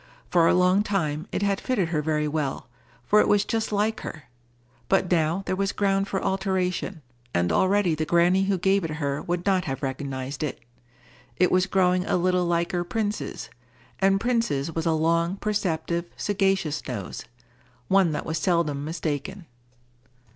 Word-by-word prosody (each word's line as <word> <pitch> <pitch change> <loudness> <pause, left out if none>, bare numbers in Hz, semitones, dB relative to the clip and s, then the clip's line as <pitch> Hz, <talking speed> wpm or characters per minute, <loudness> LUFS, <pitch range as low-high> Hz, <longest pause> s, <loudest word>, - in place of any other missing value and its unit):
For 170 -2 +5
a - - +4
long 180 +2 +4
time, 160 -7 -1
it - - -1
had 200 -1 0
fitted 200 -10 0
her 155 -3 0
very 150 0 0
well, 150 -5 -2 0.4
for 210 - +4
it - - +4
was 205 -1 +3
just 225 -2 -1
like 210 +2 0
her; 155 - -7 0.7
but 190 -2 +2
now 170 +2 +1
there - - -1
was 195 +1 0
ground 195 -1 +1
for 190 - -1
alteration, 190 -3 -1 0.3
and 85 0 +2
already 190 -2 +3
the 155 0 -1
granny 175 +3 +3
who 195 -1 +1
gave 195 +2 +2
it 155 -2 -3
her 140 -2 -2
would 175 0 -3
not 190 -3 +2
have 135 +1 -4
recognized 135 0 -4
it. 150 -3 -3 0.8
It 180 - +3
was 185 0 +3
growing 185 -1 +2
a - - +2
little 180 0 +1
liker 170 +1 0
Prince's; 210 +3 -3 0.5
and 195 0 +3
Prince's 215 - 0
was 165 0 -2
a 165 - +3
long, 165 +3 +1
perceptive, 170 -5 -1
sagacious 195 -7 0
nose,—one 125 - -3
that 150 - -3
was 160 0 -2
seldom 165 -6 0
mistaken. 160 +3 -4
175 Hz, 160 wpm, -25 LUFS, 155-195 Hz, 0.8 s, For